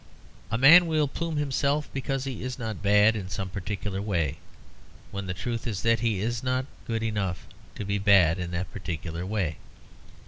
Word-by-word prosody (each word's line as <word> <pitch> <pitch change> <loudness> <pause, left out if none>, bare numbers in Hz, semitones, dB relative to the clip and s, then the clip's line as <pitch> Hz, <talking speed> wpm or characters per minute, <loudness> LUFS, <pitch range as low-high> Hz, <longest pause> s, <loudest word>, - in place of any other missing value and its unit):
A 115 - 0
man 165 +8 +8
will 155 -2 +2
plume 165 +3 -4
himself 145 +1 0
because 135 0 -2
he 135 -3 -5
is 125 0 -4
not 110 -5 -5
bad 105 +2 +5
in 95 -4 -5
some 95 +1 -4
particular 100 +1 -4
way, 85 -9 -1 0.7
when 100 -1 -5
the 90 - -2
truth 115 +4 -4
is 105 -5 -3
that 115 -1 +3
he 110 -4 0
is 115 +2 -1
not 130 0 0 0.2
good 115 -1 -1
enough 105 -5 -2 0.3
to 105 - -5
be 100 +1 -1
bad 95 -4 +5
in 90 -1 -3
that 90 +1 -3
particular 85 -2 -5
way. 95 -7 -1
105 Hz, 180 wpm, -27 LUFS, 95-125 Hz, 0.7 s, man